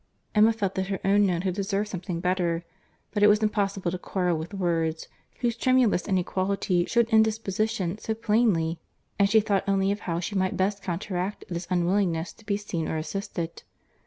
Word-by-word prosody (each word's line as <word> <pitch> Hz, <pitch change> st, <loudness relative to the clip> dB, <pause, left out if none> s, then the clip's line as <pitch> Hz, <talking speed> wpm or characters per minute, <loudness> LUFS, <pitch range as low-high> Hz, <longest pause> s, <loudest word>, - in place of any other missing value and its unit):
Emma 215 Hz, +1 st, +6 dB
felt 205 Hz, -4 st, -2 dB
that 190 Hz, 0 st, -2 dB
her 195 Hz, -1 st, -2 dB
own 200 Hz, +1 st, +4 dB
note 175 Hz, -1 st, 0 dB
had 185 Hz, -2 st, 0 dB
deserved 200 Hz, +2 st, -1 dB
something 180 Hz, -3 st, -4 dB
better; 175 Hz, -2 st, 0 dB, 0.5 s
but 205 Hz, -, -1 dB
it 205 Hz, -, +8 dB
was 210 Hz, +1 st, +4 dB
impossible 195 Hz, -4 st, 0 dB
to 180 Hz, -, -4 dB
quarrel 180 Hz, -2 st, 0 dB
with 160 Hz, +3 st, -5 dB
words, 165 Hz, -4 st, -1 dB, 0.3 s
whose 240 Hz, -2 st, +1 dB
tremulous 250 Hz, -6 st, +2 dB
inequality 185 Hz, -1 st, 0 dB
shewed 235 Hz, +2 st, +2 dB
indisposition 215 Hz, -3 st, +1 dB
so 220 Hz, -, -2 dB
plainly, 210 Hz, -8 st, +1 dB, 0.4 s
and 200 Hz, 0 st, +4 dB
she 220 Hz, +2 st, +6 dB
thought 205 Hz, -3 st, +1 dB
only 195 Hz, 0 st, +2 dB
of 205 Hz, -, -2 dB
how 165 Hz, 0 st, 0 dB
she 180 Hz, -, -4 dB
might 185 Hz, -1 st, 0 dB
best 200 Hz, +2 st, 0 dB
counteract 185 Hz, +2 st, -3 dB
this 170 Hz, 0 st, -4 dB
unwillingness 180 Hz, -1 st, +1 dB
to 225 Hz, -, -20 dB
be 205 Hz, -1 st, -1 dB
seen 175 Hz, -6 st, -3 dB
or 160 Hz, -, -2 dB
assisted. 170 Hz, +1 st, -4 dB
195 Hz, 180 wpm, -26 LUFS, 175-210 Hz, 0.5 s, it